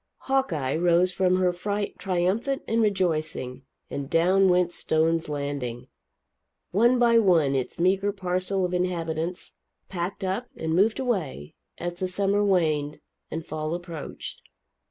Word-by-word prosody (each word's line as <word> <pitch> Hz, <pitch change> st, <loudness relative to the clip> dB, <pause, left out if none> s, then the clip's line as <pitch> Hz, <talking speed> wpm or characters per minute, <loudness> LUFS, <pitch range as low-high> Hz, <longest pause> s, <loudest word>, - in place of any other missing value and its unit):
Hawkeye 175 Hz, -, 0 dB
rose 175 Hz, +2 st, +3 dB
from 185 Hz, 0 st, +2 dB
her 185 Hz, -1 st, +2 dB
fright 200 Hz, +3 st, -3 dB
triumphant 195 Hz, +9 st, 0 dB
and 230 Hz, +1 st, +2 dB
rejoicing, 155 Hz, -, 0 dB, 0.3 s
and 140 Hz, -1 st, -4 dB
down 185 Hz, +4 st, +4 dB
went 180 Hz, -1 st, +3 dB
Stone's 165 Hz, -1 st, +1 dB
Landing! 140 Hz, -4 st, -4 dB, 0.8 s
One 235 Hz, +6 st, +4 dB
by 235 Hz, -1 st, +5 dB
one 170 Hz, -9 st, +4 dB
its 130 Hz, +3 st, -2 dB
meagre 195 Hz, +3 st, +2 dB
parcel 185 Hz, 0 st, -1 dB
of 180 Hz, -, -3 dB
inhabitants 175 Hz, -1 st, -2 dB, 0.4 s
packed 185 Hz, +2 st, -4 dB
up 195 Hz, +7 st, -2 dB
and 160 Hz, 0 st, -2 dB
moved 205 Hz, +6 st, +3 dB
away, 180 Hz, -, -2 dB, 0.2 s
as 175 Hz, 0 st, -5 dB
the 185 Hz, -, 0 dB
summer 200 Hz, +2 st, +1 dB
waned 155 Hz, -7 st, +1 dB, 0.3 s
and 160 Hz, 0 st, -5 dB
fall 155 Hz, +1 st, -3 dB
approached. 170 Hz, -3 st, -7 dB
180 Hz, 135 wpm, -26 LUFS, 160-195 Hz, 0.8 s, by